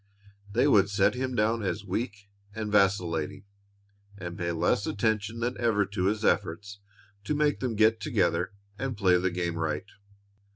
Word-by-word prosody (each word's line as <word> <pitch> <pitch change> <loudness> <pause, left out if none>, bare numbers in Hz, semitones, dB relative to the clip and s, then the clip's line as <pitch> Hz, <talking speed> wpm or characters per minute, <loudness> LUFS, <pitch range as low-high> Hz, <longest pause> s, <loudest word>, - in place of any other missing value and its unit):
They 120 +7 +3
would 100 -7 +5
set 100 - +3
him 130 0 -3
down 110 +1 +1
as 100 0 -3
weak 100 0 -4 0.3
and 110 -2 -3
vacillating, 95 -3 +1 0.7
and 85 -3 -6
pay 85 -1 -2
less 85 +4 +1
attention 110 +1 -1
than 120 +2 -1
ever 110 -4 +2
to 95 -2 -2
his 105 +2 0
efforts 100 +1 0 0.4
to 150 - -1
make 150 -1 +1
them 125 -4 -2
get 110 +1 +4
together 100 - 0 0.3
and 135 -4 -3
play 90 -3 +4
the 95 +1 +1
game 85 -2 -2
right. 80 +3 -2
100 Hz, 160 wpm, -28 LUFS, 95-115 Hz, 0.7 s, would